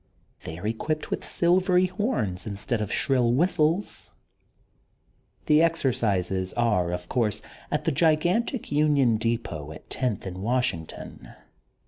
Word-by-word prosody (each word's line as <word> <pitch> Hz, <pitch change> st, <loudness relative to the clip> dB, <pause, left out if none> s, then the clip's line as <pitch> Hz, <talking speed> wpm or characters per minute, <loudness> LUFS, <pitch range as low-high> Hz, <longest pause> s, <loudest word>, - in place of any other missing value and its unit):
They 80 Hz, -, -6 dB
are 90 Hz, -, -8 dB
equipped 155 Hz, +8 st, -2 dB
with -, -, -2 dB
silvery 180 Hz, +1 st, +3 dB
horns 180 Hz, -, -2 dB
instead 105 Hz, +3 st, -2 dB
of 105 Hz, -, -3 dB
shrill 125 Hz, -3 st, +2 dB
whistles. 170 Hz, +4 st, +1 dB, 1.3 s
The 150 Hz, 0 st, +5 dB
exercises 100 Hz, -, 0 dB
are, 105 Hz, -8 st, +1 dB
of 90 Hz, 0 st, -4 dB
course, 110 Hz, -3 st, -1 dB, 0.3 s
at -, -, -1 dB
the -, -, +1 dB
gigantic 175 Hz, -, +1 dB
Union 145 Hz, -6 st, +3 dB
Depot 110 Hz, -10 st, -3 dB
at 80 Hz, -, -13 dB
Tenth 125 Hz, -8 st, -2 dB
and 90 Hz, -1 st, -6 dB
Washington. 115 Hz, -8 st, -3 dB
125 Hz, 120 wpm, -26 LUFS, 100-160 Hz, 1.3 s, The